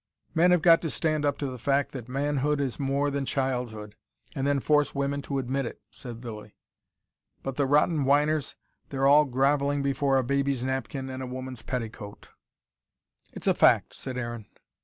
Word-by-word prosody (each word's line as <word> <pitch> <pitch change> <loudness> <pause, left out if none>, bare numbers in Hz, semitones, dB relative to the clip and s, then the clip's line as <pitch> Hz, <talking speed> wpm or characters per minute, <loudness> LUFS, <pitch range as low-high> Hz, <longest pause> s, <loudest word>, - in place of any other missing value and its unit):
"Men 170 +2 +4
have 180 -3 +3
got 165 -1 +7
to 160 - -2
stand 155 -1 +1
up 145 -1 +1
to 145 - -3
the 130 -2 -5
fact 140 +3 +1
that 125 -3 -8
manhood 145 +2 0
is 135 -4 -2
more 140 +1 0
than 140 0 -1
childhood 125 -6 -3 0.4
and 135 +1 -1
then 140 -1 +2
force 150 +1 +2
women 140 +1 -1
to 140 0 -3
admit 135 0 -1
it," - - -9
said 120 -1 -4
Lilly. 105 -2 -8 0.9
"But 135 -1 -4
the 140 -1 +1
rotten 150 +2 +3
whiners, 145 +2 +2 0.3
they're 135 -1 -1
all 145 +2 +6
grovelling 140 +2 +1
before 135 0 +1
a 130 - +2
baby's 140 0 0
napkin 130 +1 -3
and 130 0 -6
a 130 - -4
woman's 130 -1 -6
petticoat." 110 -5 -6 1.0
"It's - - -5
a - - +4
fact," - - +4
said 130 -1 -5
Aaron. 120 -3 -5
135 Hz, 180 wpm, -27 LUFS, 130-145 Hz, 1.0 s, got